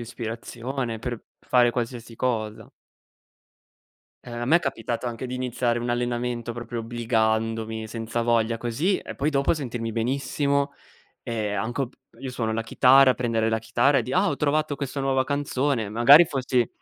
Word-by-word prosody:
ispirazione 120 +1 -5
per 120 0 -5 0.2
fare 125 -1 +3
qualsiasi 120 -1 -4
cosa. 110 -3 -2 1.5
Ehm, 120 - -9
a - - -1
me 160 - +6
è - - +4
capitato 120 -5 -3
anche 120 +1 -4
di 125 - -5
iniziare 125 -1 -1
un 120 +1 -3
allenamento, 120 -1 -2
proprio 120 0 -5
obbligandomi, 110 -1 -1
senza 115 +1 -3
voglia, 115 -1 +2
così, 130 - 0
e - - -8
poi, 145 +2 0
dopo, 140 0 +2
sentirmi 120 -6 -4
benissimo. 140 +4 0 0.5
E 110 -3 -3
anch 110 +5 -3
o 135 - 0
p 130 - -25 0.3
io 135 -1 -5
suono 115 -3 -2
la 115 +1 -1
chitarra: 130 +3 +5
prendere 115 -2 0
la 110 0 +1
chitarra 120 +5 +2
e - - 0
di': 125 - -6
“Ah, 190 +5 +3
ho - - -1
trovato 150 0 0
questo 140 0 -4
nuova 135 -1 +1
canzone.” 140 -4 -1
Magari 120 +10 +7
fossi 130 -5 0
120 Hz, 165 wpm, -25 LUFS, 115-135 Hz, 1.5 s, Magari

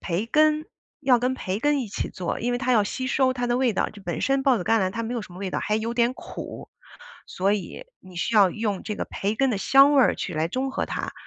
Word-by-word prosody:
培 185 +5 -2
根， 305 +4 +2 0.3
要 255 -2 +4
跟 250 +2 0
培 195 -5 -3
根 290 0 +2
一 240 - -4
起 200 - -3
做， 180 -2 -4
因 240 - -1
为 245 - -1
它 255 -1 0
要 215 -3 +4
吸 255 +5 -4
收 260 0 +2
它 245 -1 -2
的 240 0 +1
味 255 -3 +2
道， - - 0
就 205 - -14
本 175 -4 -4
身 270 0 +1
抱 265 -3 +4
子 180 - -4
甘 225 +2 +3
蓝 185 - 0
它 230 - -3
没 235 +2 -4
有 235 - -3
什 185 - -12
么 180 - -11
味 195 -1 -4
道， - - -2
还 210 - 0
有 230 +2 -3
点 240 +1 +2
苦， - - -9 0.6
所 195 +2 0
以 210 - -5
你 185 -1 -15
需 225 +6 -2
要 195 -3 +6
用 210 -1 -3
这 210 - -3
个 - - -3
培 205 +2 -3
根 270 +2 +1
的 205 - -1
香 275 +6 +6
味 275 - +6
儿 - - +4
去 180 - -5
来 155 +1 0
中 265 +6 -2
和 - - -2
它。 - - -4
230 Hz, 300 characters per minute, -24 LUFS, 195-260 Hz, 0.6 s, 要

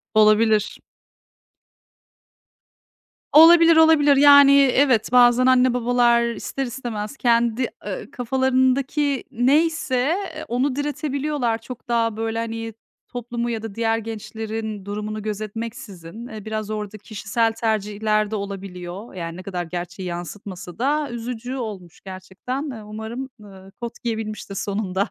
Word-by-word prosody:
Olabilir. 215 0 +3 2.5
Olabilir, 330 +1 +8
olabilir. 315 -3 +6
Yani, 285 -1 +8
evet, 260 -4 +3
bazen 245 0 +5
anne 255 -1 +4
babalar 240 -1 +3
ister 270 - -4
istemez 240 -1 -5
kendi, 235 0 +2 0.2
ııı, 190 - -6
kafalarındaki 260 +3 +1
neyse, 290 +3 +1 0.4
eee, 310 - -7
onu 255 +3 0
diretebiliyorlar 285 -4 -2
çok 230 +1 -11
daha, 230 -2 0
böyle, 225 0 -2
hani, 225 0 -4 0.3
toplumu 240 -1 -4
ya 225 -2 -3
da 220 -3 -7
diğer 225 -1 +1
gençlerin 220 -1 -6
durumunu 210 +1 -4
gözetmeksizin. 215 -1 -6
Eee, 215 -4 -9
biraz 215 -1 -4
orada 215 -1 -5
kişisel 220 +2 -1
tercihler 215 -1 -1
de - - -1
olabiliyor. 195 0 -7
Yani, 170 -2 -6
ne 185 - -9
kadar 180 -2 -4
gerçeği 180 +2 -6
yansıtmasa 180 +1 -8
da 290 +3 0
üzücü 240 +1 -5
olmuş 205 -9 -7
gerçekten. 195 - -6
Iıı, 220 -4 -9
umarım, 220 +5 -6
ııı, 195 -2 -14
kot 235 -1 -7
giyebilmiştir 215 -3 -4
sonunda 195 -1 -2
225 Hz, 120 wpm, -22 LUFS, 210-255 Hz, 2.5 s, Olabilir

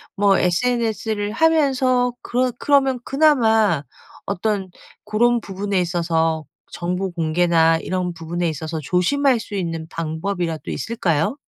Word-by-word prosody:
뭐 200 -2 +3
sns를 220 +2 0
하면서 260 -4 +2
그러 250 +1 0
그러면 270 -3 +2
그나마 225 - +3 0.4
어떤 200 0 -2 0.3
고런 235 +3 +2
부분에 200 -1 -2
있어서 165 -2 0 0.3
정보 180 +2 -3
공개나 165 0 +2
이런 180 -1 -2
부분에 170 +1 -3
있어서 160 +1 -4
조심할 235 - +2
수 220 -2 -7
있는 165 -4 -3
방법이라도 165 +1 -3
있을까요? 195 - -1
195 Hz, 280 characters per minute, -21 LUFS, 165-240 Hz, 0.4 s, 뭐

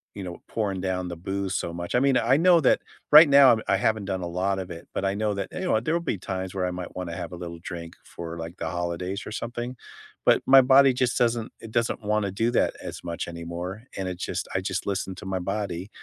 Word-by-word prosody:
you 100 - -6
know, 90 -1 -7
pouring 100 -4 -2
down 90 -1 -2
the 85 - -5
booze 95 +2 -3
so 85 - -2
much. 85 +4 -4
I - - +5
mean, 135 -1 +3
I 125 +4 +3
know 175 +1 +6
that 135 - +3 0.3
right 150 +2 +10
now 140 -4 +7
I 95 - +3
haven't 110 -1 0
done 95 -1 -2
a 90 - -3
lot 95 +3 -1
of 95 -1 -6
it, 85 -1 -9
but - - -2
I 95 0 0
know 105 0 0
that, 100 -1 -3
you - - -5
know, 180 -12 +2
there 155 +9 -1
will - - +2
be 135 - -2
times 95 0 -4
where 95 -2 -1
I - - -2
might 90 -1 -7
wanna 90 -2 -4
have 85 - -5
a - - -6
little 85 -1 -7
drink 85 0 -8
for, 85 0 -8
like, 85 +2 -7
the 80 - -3
holidays 85 +3 -3
or - - -7
something. 120 +2 -4 0.5
But - - +4
my 135 0 +8
body 135 +1 +6
just 125 -1 0
doesn't 120 -1 +1
it 115 - -10
doesn't 115 0 0
want 105 +1 +1
to 100 - -2
do 115 +5 0
that 120 - +1
as - - -7
much 85 -1 -4
anymore. 85 +4 -6
And 95 -1 -2
it 90 -1 -4
just - - -3
I 95 - +1
just 95 -1 -3
listen 95 -1 -2
to 95 - -10
my 95 -1 -2
body. 95 -1 -3
95 Hz, 260 wpm, -26 LUFS, 90-115 Hz, 0.5 s, right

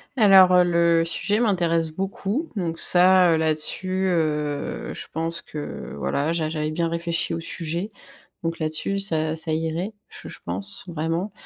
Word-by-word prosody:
Alors, 195 -5 +7
heu, 180 - +6
le 170 -1 +3
sujet 200 +5 +1
m'intéresse 170 -7 +1
beaucoup 195 - -3
donc 170 -5 -3
ça, 180 -1 +5
heu, 160 - +2
là-dessus, 160 +4 -1
heu, 150 -4 -1
je - - -7
pense 165 +1 -2
que 150 -1 -7
voilà, 145 - -1
j'a 160 -2 -1
j'avais 155 -1 -2
bien 165 +1 0
réfléchi 170 0 -1
au 165 - -2
sujet 170 +4 -3 0.5
donc 165 0 -2
là-dessus 155 +5 -1
ça 160 -5 0
ça 160 0 -3
irait. 165 +6 -2 0.2
Je - - -11
je - - -10
pense 200 0 -4
vraiment 165 +4 -2
170 Hz, 155 wpm, -23 LUFS, 160-185 Hz, 0.5 s, Alors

